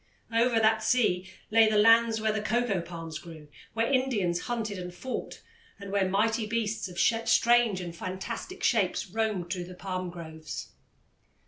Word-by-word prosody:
Over 230 0 +3
that 220 0 +3
sea 215 -6 +1 0.2
lay 225 0 +6
the 215 - +2
lands 225 +1 +5
where 215 0 +1
the 215 0 -2
coco 215 -3 0
palms 165 -2 -7
grew, 155 -2 -12 0.3
where 225 0 +2
Indians 230 -10 +1
hunted 220 -4 -3
and 180 0 -6
fought, 250 +9 -6 0.4
and 200 -1 -8
where 195 -2 +1
mighty 220 +3 +1
beasts 220 -2 -1
of 180 -1 -11
strange 230 -1 +3
and 170 -1 -6
fantastic 225 - -6
shapes 210 -3 +1
roamed 205 -5 -1
through 180 -2 -4
the 180 +1 -10
palm 185 -1 -4
groves. 160 -3 -8
210 Hz, 155 wpm, -28 LUFS, 180-230 Hz, 0.4 s, lay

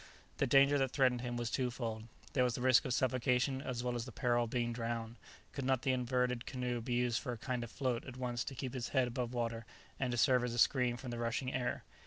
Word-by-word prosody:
The 140 - +1
danger 140 +3 +5
that 135 -1 +2
threatened 125 -2 +2
him 120 -1 -3
was 120 -1 -2
twofold, 120 -4 -2 0.3
there 130 - +3
was 125 -2 +1
the - - -4
risk 130 -1 +5
of 130 - 0
suffocation 130 +1 +1
as 125 -3 -3
well 125 -1 -1
as 120 -1 -3
the 130 - -8
peril 120 -1 +1
of - - -7
being 120 0 -1
drowned; 115 0 -3 0.3
could 140 - -4
not 130 -1 +1
the 130 - +2
inverted 125 -1 0
canoe 125 -2 -2
be 120 +2 -3
used 120 -1 +1
for 125 - -3
a - - -6
kind 125 +1 -3
of 120 - -7
float 125 -2 -2
at 130 -1 -8
once 120 -2 -2
to 135 - -5
keep 130 0 -4
his 125 -3 -3
head 130 -1 +4
above 120 0 -3
water 115 -2 -2 0.4
and 130 - 0
to 120 - -1
serve 125 0 +4
as 120 -1 -2
a - - -4
screen 125 0 +3
from 125 0 -6
the 120 - -4
rushing 120 +3 -1
air? 125 -1 -2
125 Hz, 255 wpm, -35 LUFS, 120-130 Hz, 0.4 s, danger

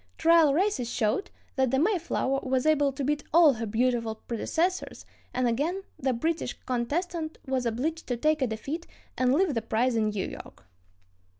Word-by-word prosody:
Trial 330 -2 +5
races 350 - +1
showed 240 - 0 0.3
that 265 -1 +3
the 265 - +1
Mayflower 325 -5 +1
was 260 0 0
able 290 -3 +3
to 275 +1 -5
beat 295 +2 0
all 325 -3 +7
her 230 -1 -4
beautiful 230 0 0
predecessors, 325 - -2 0.3
and 255 -1 0
again 310 +11 -1 0.2
the 265 0 +1
British 320 +7 -1
contestant 315 +6 -2
was 260 -3 -1
obliged 305 +9 -2
to 245 - -1
take 305 +4 +1
a 260 - +2
defeat 275 +10 -5 0.3
and 255 -1 +2
leave 325 +3 +2
the 230 - -1
prize 230 +3 0
in 215 -1 +2
New 210 -2 -2
York. 95 - -10
265 Hz, 170 wpm, -27 LUFS, 235-320 Hz, 0.3 s, all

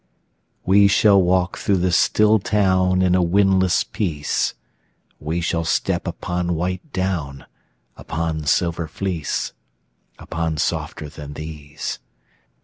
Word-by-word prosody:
We 100 +2 +6
shall 100 0 +5
walk 90 0 +1
through 100 - +1
the 90 0 +1
still 105 +5 +4
town 95 -2 +2
In 90 -1 +3
a 90 - +3
windless 95 0 +3
peace; 80 -8 -2 0.6
We 80 +4 -2
shall 85 0 -1
step 80 - -1
upon 90 0 -2
white 90 - -3
down, 85 - -3 0.5
Upon 80 -2 -3
silver 85 +1 +1
fleece, 90 -3 -3 0.6
Upon 80 -1 -3
softer 75 +1 -2
than 75 0 -9
these. 75 0 -6
90 Hz, 115 wpm, -21 LUFS, 80-95 Hz, 0.6 s, We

